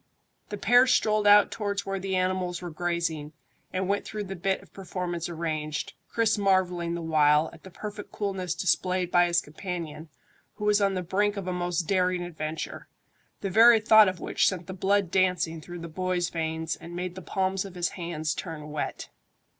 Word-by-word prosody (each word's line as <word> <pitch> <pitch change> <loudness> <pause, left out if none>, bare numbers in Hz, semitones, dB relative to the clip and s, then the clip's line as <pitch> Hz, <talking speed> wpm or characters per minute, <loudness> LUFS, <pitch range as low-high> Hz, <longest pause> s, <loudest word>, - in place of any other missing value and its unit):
The 205 - -4
pair 245 +5 +5
strolled 215 -3 +3
out 205 0 +7
towards 200 -2 -2
where 195 0 -2
the 190 0 -2
animals 185 -1 0
were 175 -1 -6
grazing, 165 -2 -2 0.4
and 185 0 -1
went 200 +1 0
through 215 -1 -5
the 195 -1 -6
bit 190 +2 -1
of - - -21
performance 180 -3 -4
arranged, 155 -3 -3 0.2
Chris 225 -2 +1
marvelling 180 -3 +1
the 170 - -5
while 150 -1 +3
at 165 - -14
the 190 - -12
perfect 210 +3 -8
coolness 190 -4 -3
displayed 185 -1 0
by 175 0 +5
his 175 0 +2
companion, 160 -1 -6 0.5
who 210 0 -5
was 210 0 +3
on 195 -1 +2
the 185 - -2
brink 205 +4 0
of 195 - -4
a 185 - -1
most 175 -1 -1
daring 180 0 +1
adventure, 160 -2 -5 0.5
the 195 - -2
very 225 +3 +7
thought 220 -1 +7
of 185 - -6
which - - +1
sent 180 -3 -1
the 190 - -7
blood 195 -1 +1
dancing 180 -4 +1
through 175 +3 -8
the 170 - -6
boy's 180 +1 -1
veins 160 -1 -2
and 170 +1 -10
made 180 0 -3
the 185 - -8
palms 190 +1 -1
of 195 -2 -10
his 175 -1 0
hands 170 -3 -3
turn 155 -4 -7
wet. 150 - -4
180 Hz, 190 wpm, -27 LUFS, 170-195 Hz, 0.5 s, out